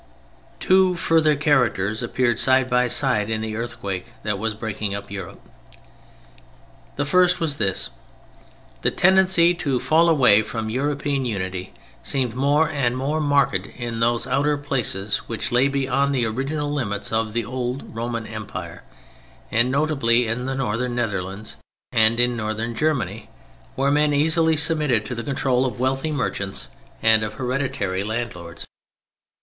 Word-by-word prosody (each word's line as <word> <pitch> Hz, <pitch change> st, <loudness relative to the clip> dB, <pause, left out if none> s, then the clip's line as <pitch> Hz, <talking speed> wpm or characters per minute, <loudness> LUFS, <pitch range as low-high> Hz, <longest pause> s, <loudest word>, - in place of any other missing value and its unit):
Two 185 Hz, -1 st, +3 dB
further 160 Hz, -3 st, +2 dB
characters 120 Hz, -8 st, +1 dB
appeared 120 Hz, -1 st, 0 dB
side 130 Hz, -1 st, +4 dB
by 125 Hz, 0 st, +2 dB
side 125 Hz, -4 st, +5 dB
in 110 Hz, -1 st, -1 dB
the 110 Hz, -1 st, -4 dB
earthquake 115 Hz, -2 st, -5 dB
that 105 Hz, -2 st, -2 dB
was 110 Hz, 0 st, -2 dB
breaking 105 Hz, -2 st, -4 dB
up 100 Hz, 0 st, -8 dB
Europe. 95 Hz, -4 st, -7 dB, 1.6 s
The 145 Hz, -, -1 dB
first 180 Hz, +4 st, +3 dB
was 155 Hz, -4 st, 0 dB
this: 95 Hz, -3 st, -1 dB, 0.9 s
the -, -, +3 dB
tendency 190 Hz, -2 st, +4 dB
to 145 Hz, -8 st, -1 dB
fall 165 Hz, +5 st, +3 dB
away 125 Hz, -9 st, +5 dB
from 110 Hz, 0 st, -4 dB
European 140 Hz, +1 st, -1 dB
unity 95 Hz, -4 st, -4 dB, 0.3 s
seemed 130 Hz, -4 st, -1 dB
more 145 Hz, +5 st, +2 dB
and 135 Hz, -5 st, -1 dB
more 145 Hz, +4 st, -1 dB
marked 140 Hz, -2 st, +2 dB, 0.2 s
in 120 Hz, -2 st, -4 dB
those 115 Hz, +1 st, +1 dB
outer 145 Hz, +1 st, +1 dB
places 120 Hz, -8 st, -1 dB
which 115 Hz, -, -3 dB
lay 125 Hz, +3 st, +3 dB
beyond 140 Hz, 0 st, 0 dB
the 120 Hz, -3 st, +1 dB
original 145 Hz, +6 st, -2 dB
limits 105 Hz, -8 st, -2 dB
of 110 Hz, -1 st, -1 dB
the 120 Hz, -1 st, -1 dB
old 125 Hz, +1 st, -5 dB
Roman 115 Hz, 0 st, -3 dB
Empire, 110 Hz, -2 st, -7 dB, 0.7 s
and 120 Hz, +3 st, +3 dB
notably 135 Hz, -4 st, +2 dB
in 120 Hz, +3 st, -2 dB
the 135 Hz, 0 st, -3 dB
Northern 125 Hz, -1 st, -2 dB
Netherlands 100 Hz, -3 st, -4 dB, 0.3 s
and 110 Hz, +1 st, +3 dB
in 120 Hz, 0 st, +3 dB
Northern 110 Hz, +1 st, -3 dB
Germany—where 125 Hz, -, -3 dB
men 150 Hz, 0 st, +2 dB
easily 160 Hz, +2 st, +3 dB
submitted 150 Hz, -7 st, +2 dB
to 125 Hz, -, -5 dB
the 115 Hz, -, -4 dB
control 130 Hz, -2 st, 0 dB
of 125 Hz, -4 st, -3 dB
wealthy 135 Hz, +4 st, -1 dB
merchants 100 Hz, -8 st, -3 dB, 0.3 s
and 110 Hz, 0 st, +5 dB
of 105 Hz, -1 st, -3 dB
hereditary 125 Hz, -8 st, -2 dB
landlords. 105 Hz, -7 st, -5 dB
125 Hz, 145 wpm, -22 LUFS, 110-145 Hz, 1.6 s, side